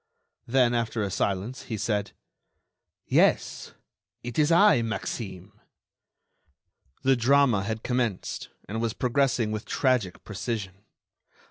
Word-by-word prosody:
Then, 125 Hz, -1 st, +3 dB
after 115 Hz, -2 st, -1 dB
a 100 Hz, -, -2 dB
silence, 100 Hz, +7 st, -2 dB
he 110 Hz, -, -4 dB
said: 105 Hz, -1 st, -1 dB, 0.9 s
"Yes, -, -, +1 dB, 0.5 s
it 120 Hz, +4 st, -4 dB
is 150 Hz, +2 st, +3 dB
I, 175 Hz, -, +6 dB
Maxime." 105 Hz, -4 st, -5 dB, 1.5 s
The 135 Hz, 0 st, +4 dB
drama 125 Hz, -3 st, +4 dB
had 110 Hz, +2 st, -4 dB
commenced 120 Hz, -6 st, -2 dB, 0.2 s
and 110 Hz, +3 st, -3 dB
was 115 Hz, -2 st, -1 dB
progressing 125 Hz, -3 st, +1 dB
with 110 Hz, 0 st, -4 dB
tragic 125 Hz, -9 st, 0 dB
precision. 100 Hz, -2 st, -5 dB
115 Hz, 110 wpm, -27 LUFS, 105-125 Hz, 1.5 s, I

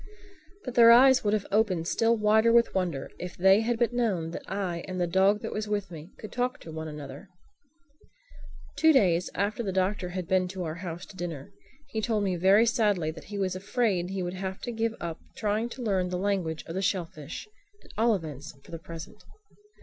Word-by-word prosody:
But 255 Hz, -, -5 dB
their 235 Hz, -1 st, +7 dB
eyes 260 Hz, +2 st, +7 dB
would 210 Hz, -1 st, +1 dB
have 205 Hz, -, -2 dB
opened 195 Hz, -6 st, +1 dB
still 230 Hz, +4 st, +2 dB
wider 220 Hz, +2 st, +4 dB
with 235 Hz, 0 st, +4 dB
wonder 175 Hz, -8 st, -2 dB
if 180 Hz, 0 st, -7 dB
they 190 Hz, +3 st, +6 dB
had 235 Hz, +1 st, 0 dB
but 235 Hz, 0 st, +1 dB
known 195 Hz, -10 st, 0 dB
that -, -, -6 dB
I 185 Hz, -4 st, -2 dB
and 185 Hz, -1 st, -4 dB
the 175 Hz, -, +2 dB
dog 190 Hz, +4 st, +2 dB
that -, -, -4 dB
was 215 Hz, 0 st, -3 dB
with 205 Hz, -2 st, -2 dB
me 160 Hz, +1 st, -9 dB
could 215 Hz, -, -9 dB
talk 250 Hz, +1 st, -1 dB
to 160 Hz, -, -9 dB
one 160 Hz, 0 st, -5 dB
another. 150 Hz, +4 st, -9 dB, 1.5 s
Two 320 Hz, -, +5 dB
days 180 Hz, -, +3 dB
after 205 Hz, +3 st, -1 dB
the 200 Hz, -4 st, -2 dB
Doctor 185 Hz, 0 st, 0 dB
had 180 Hz, -1 st, -5 dB
been 185 Hz, -1 st, +2 dB
to 185 Hz, 0 st, -5 dB
our 160 Hz, -2 st, -3 dB
house 175 Hz, -1 st, -6 dB
to -, -, -15 dB
dinner 170 Hz, -6 st, -6 dB, 0.4 s
he 220 Hz, -4 st, -2 dB
told 215 Hz, -2 st, 0 dB
me 190 Hz, -2 st, 0 dB
very 195 Hz, +6 st, +5 dB
sadly 205 Hz, -8 st, +1 dB
that 160 Hz, -, -12 dB
he 205 Hz, -, -7 dB
was 190 Hz, -2 st, -1 dB
afraid 195 Hz, -2 st, 0 dB
that 190 Hz, -, -6 dB
he 190 Hz, -1 st, -2 dB
would 175 Hz, 0 st, -3 dB
have 190 Hz, 0 st, -5 dB
to 240 Hz, -, -4 dB
give 225 Hz, 0 st, -1 dB
up 170 Hz, -2 st, -5 dB, 0.2 s
trying 215 Hz, +2 st, 0 dB
to 250 Hz, +1 st, -7 dB
learn 190 Hz, -5 st, 0 dB
the 180 Hz, -, -2 dB
language 185 Hz, -5 st, -1 dB
of 165 Hz, -, -7 dB
the 190 Hz, -, -2 dB
shellfish—at 190 Hz, -, -5 dB
all 225 Hz, +1 st, +3 dB
events 150 Hz, -5 st, -7 dB
for -, -, -16 dB
the 165 Hz, -, -6 dB
present. 165 Hz, +6 st, -10 dB
190 Hz, 210 wpm, -28 LUFS, 175-220 Hz, 1.5 s, their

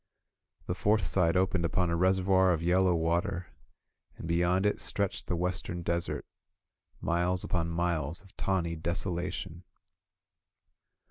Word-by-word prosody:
The -, -, -1 dB
fourth 105 Hz, -2 st, +2 dB
side 85 Hz, 0 st, +2 dB
opened 95 Hz, -1 st, +1 dB
upon 85 Hz, +1 st, +1 dB
a -, -, +1 dB
reservoir 95 Hz, +1 st, +3 dB
of 85 Hz, 0 st, -2 dB
yellow 90 Hz, +1 st, +3 dB
water, 85 Hz, +2 st, -1 dB, 0.7 s
and -, -, -7 dB
be 85 Hz, 0 st, +1 dB
yond 90 Hz, +3 st, +2 dB
it 105 Hz, -, +1 dB
stretched 100 Hz, -2 st, -2 dB
the 90 Hz, -, 0 dB
western 90 Hz, 0 st, -2 dB
desert, 85 Hz, +1 st, -2 dB, 0.8 s
miles 90 Hz, +2 st, 0 dB
upon 85 Hz, -2 st, -1 dB
miles 85 Hz, -1 st, -1 dB
of 95 Hz, -, -20 dB
tawny 85 Hz, -4 st, -1 dB
desolation. 85 Hz, +1 st, -3 dB
90 Hz, 130 wpm, -30 LUFS, 85-95 Hz, 0.8 s, reservoir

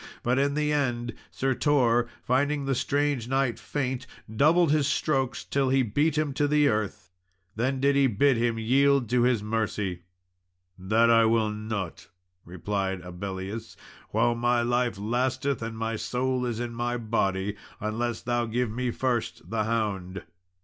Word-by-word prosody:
But 125 Hz, +2 st, +2 dB
in 140 Hz, +1 st, +1 dB
the 150 Hz, 0 st, +1 dB
end, 120 Hz, -5 st, -1 dB, 0.2 s
Sir 135 Hz, 0 st, -1 dB
Tor, 120 Hz, -4 st, +2 dB, 0.2 s
finding 140 Hz, +3 st, +1 dB
the 135 Hz, -, +1 dB
strange 140 Hz, -2 st, 0 dB
knight 130 Hz, -3 st, 0 dB
faint, 130 Hz, +2 st, -3 dB, 0.3 s
doubled 160 Hz, +5 st, +4 dB
his 150 Hz, -2 st, +2 dB
strokes 135 Hz, -3 st, 0 dB
until 135 Hz, -1 st, 0 dB
he 135 Hz, 0 st, +3 dB
beat 145 Hz, +7 st, +1 dB
him 150 Hz, -2 st, 0 dB
to 145 Hz, +2 st, +1 dB
the 150 Hz, 0 st, +4 dB
earth. 105 Hz, -6 st, -3 dB, 0.4 s
Then 130 Hz, +4 st, 0 dB
did 140 Hz, +1 st, +3 dB
he 140 Hz, -1 st, +4 dB
bid 130 Hz, +4 st, +3 dB
him 115 Hz, 0 st, 0 dB
yield 135 Hz, +3 st, +3 dB
to 125 Hz, -1 st, +3 dB
his 120 Hz, -3 st, +2 dB
mercy. 105 Hz, -4 st, -2 dB, 0.7 s
"That 110 Hz, +5 st, +2 dB, 0.2 s
will 110 Hz, -1 st, +2 dB
I -, -, -4 dB
not," 105 Hz, -4 st, -5 dB, 0.4 s
replied 95 Hz, +1 st, -3 dB
Abellius, 95 Hz, +4 st, -6 dB, 0.3 s
"while 120 Hz, +2 st, +2 dB
my 120 Hz, 0 st, +1 dB
life 120 Hz, -2 st, 0 dB
lasteth 130 Hz, +5 st, -1 dB
and 115 Hz, 0 st, -5 dB
my 115 Hz, 0 st, -2 dB
soul 125 Hz, +2 st, -1 dB
is 115 Hz, -2 st, -3 dB
in 120 Hz, -1 st, -4 dB
my 120 Hz, +1 st, -2 dB
body, 105 Hz, -3 st, -1 dB, 0.2 s
unless 110 Hz, +2 st, -2 dB
thou 120 Hz, -1 st, 0 dB
give 120 Hz, 0 st, -1 dB
me 125 Hz, +2 st, -2 dB
first 120 Hz, -7 st, -2 dB
the 110 Hz, -2 st, 0 dB
hound." 100 Hz, -4 st, -2 dB
120 Hz, 155 wpm, -27 LUFS, 110-135 Hz, 0.7 s, doubled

